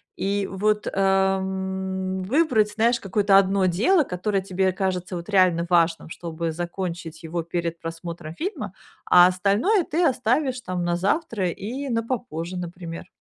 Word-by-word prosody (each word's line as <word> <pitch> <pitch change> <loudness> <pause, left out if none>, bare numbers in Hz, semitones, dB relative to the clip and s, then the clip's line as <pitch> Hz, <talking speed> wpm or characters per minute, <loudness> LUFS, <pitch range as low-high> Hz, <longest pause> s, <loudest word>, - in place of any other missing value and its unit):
И 200 0 -1
вот, 210 +2 0
эм, 190 -1 0
выбрать, 230 - +2
знаешь, 235 +2 +2
какое-то 195 0 +3
1 195 -1 +3
дело, 250 - +3
которое 195 -1 -1
тебе 190 0 0
кажется, 185 -1 -2
вот, 170 +3 -7
реально 180 -4 +3
важным, 165 -2 +2
чтобы 165 0 -4
закончить 170 -1 -5
его 165 0 -3
перед 170 0 -3
просмотром 165 -1 -7
фильма, 375 - -4 0.3
а 180 0 +7
остальное 205 - +2
ты 330 +3 0
оставишь, 255 -1 +1
там, 180 -3 -3
на 175 0 0
завтра 200 - 0
и 255 +10 -5
на 230 -2 +1
попозже, 205 -8 -4
например. 175 -1 -7
190 Hz, 140 wpm, -24 LUFS, 175-210 Hz, 0.3 s, а